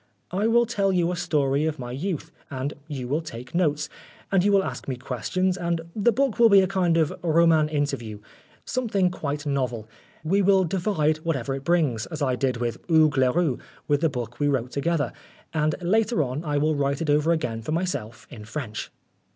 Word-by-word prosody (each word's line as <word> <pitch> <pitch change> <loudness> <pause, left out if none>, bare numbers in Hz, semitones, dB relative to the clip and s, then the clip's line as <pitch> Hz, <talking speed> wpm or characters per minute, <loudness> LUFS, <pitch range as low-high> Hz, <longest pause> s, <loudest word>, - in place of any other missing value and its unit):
" - - -44
I 200 +5 +1
will 235 +1 +4
tell 205 -4 0
you 175 -2 +1
a - - -2
story 145 -3 +1
of 155 -1 -2
my 120 -3 -6
youth, 160 +5 -4 0.2
and 135 +2 -3
you 135 -5 -5
will 145 +5 0
take 125 -5 -9
notes, 150 -4 +1 0.4
and 190 -2 +3
you 205 - +3
will 195 -1 +4
ask - - -6
me 130 - -2
questions, 135 - -1
and 170 -2 -1
the 220 +2 +3
book 260 0 0
will 230 -1 +7
be 200 -2 +7
a 190 - +1
kind 180 -3 +1
of 160 -2 +2
r 165 -1 +3
oman 160 -2 +4
interview 140 -8 -2 0.5
something 205 -8 0
quite 150 -4 -4
novel. 125 -6 -2 0.4
We 190 +6 +2
will 195 0 +4
divide 170 -4 +1
whatever 140 -5 -2
it 135 0 -5
brings, 145 -10 +1
as 160 -2 -6
I 130 -2 +1
did 130 -1 0
with 120 -1 -2
Hugues 160 -3 +4
Leroux 130 +2 +2 0.3
with 145 0 +2
the 165 - +3
book 120 -3 -6
we 145 - +2
wrote 130 -3 0
together, 145 -2 0 0.4
and 155 -1 +1
later 215 +1 +2
on 130 +4 -4
I 150 -3 -1
will 155 +2 +2
write 140 +1 0
it 155 - -3
over 150 +3 +3
again 125 -9 -1
for 115 - -5
myself 160 -10 -3
in 105 - -9
French." 115 -3 -5
155 Hz, 205 wpm, -25 LUFS, 135-180 Hz, 0.5 s, will